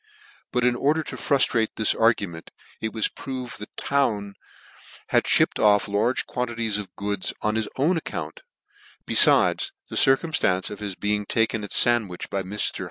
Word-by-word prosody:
But 125 0 +1
in 125 -1 +3
order 150 +5 +1
to - - -7
truftrattr 125 -5 +1
this 110 - +2
argument, 100 -8 0 0.3
it 110 - -3
was 110 -1 0
proved 130 -2 -7
that 105 - -11
Town 105 -8 0 0.8
had - - +2
(hipped - - +2
off 105 -1 +4
la 105 +4 +1
ge - - -1
quamkies 115 -4 -2
of 100 - -9
goods 100 -1 -3
on 105 - +1
his 110 -1 -1
own 160 +7 +2
account: - - -6 0.7
btfides, - - +4 0.2
the - - -4
circum 135 +4 +4
flancc 95 -11 0
of 105 - -7
his 100 -3 -5
being 105 +1 -1
taken 115 -1 +1
at 100 - -7
Sandwich 110 -7 +1
by 100 - -1
Vr. 100 +3 -2
110 Hz, 165 wpm, -24 LUFS, 105-125 Hz, 0.8 s, off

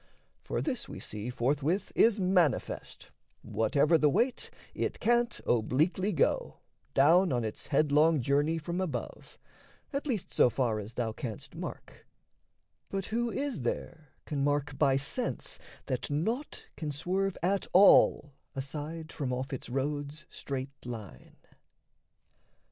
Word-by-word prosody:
For - - -3
this 260 -6 -3
we - - -7
see 105 +3 -5
forthwith 145 - 0
is 225 -2 +4
manifest: 180 -6 0 0.3
Whatever 145 +8 +2
the 150 - +4
weight, 240 - 0 0.2
it - - -2
can't 240 +1 +2
obliquely 155 - +1
go, 165 - +1 0.4
Down 170 +7 +5
on 120 -2 +1
its 110 - -5
headlong 150 +2 +4
journey 145 +5 +2
from 170 +3 -3
above, 185 -5 -5 0.6
At 280 +2 -2
least 225 -9 -2
so - - +5
far 115 -3 0
as 105 +3 -8
thou 115 -2 -1
canst 110 -1 -6
mark; - - -8 0.8
but 195 -1 -3
who 240 +1 +1
Is 270 - -2
there 145 +4 -4
can 140 -2 -2
mark 145 0 0
by 135 0 +3
sense 140 - -3 0.3
that - - -2
naught 220 - -2
can 155 -2 -4
swerve 185 +6 -1
At 195 +2 +1
all 180 -6 +6 0.2
aside 150 +4 -5
from 135 -4 -3
off 130 +2 -3
its 130 - -5
road's 145 +3 -3
straight 135 0 -6
line? 115 -5 -9
150 Hz, 130 wpm, -30 LUFS, 135-185 Hz, 0.8 s, all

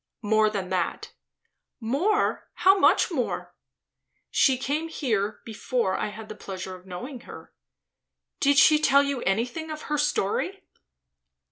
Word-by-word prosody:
"More 215 +1 +3
than 195 -3 -4
that" 180 -2 -2 0.7
"More? 300 - 0
How 385 +1 +4
much - - +4
more?" 260 -8 -3 0.8
"She 265 -2 +3
came 295 +5 -2
here 220 -10 -2
before 225 -2 -1
I - - -2
had 215 +1 -9
the 215 - -7
pleasure 190 -2 -7
of 185 +1 -16
knowing 245 +9 -7
her." - - -12 0.9
"Did 285 0 +3
she 305 +2 +7
tell 280 -2 +4
you 280 -3 -2
anything 245 - -1
of 310 0 -6
her 300 -1 -2
story?" 300 - -1
250 Hz, 135 wpm, -26 LUFS, 210-300 Hz, 0.9 s, she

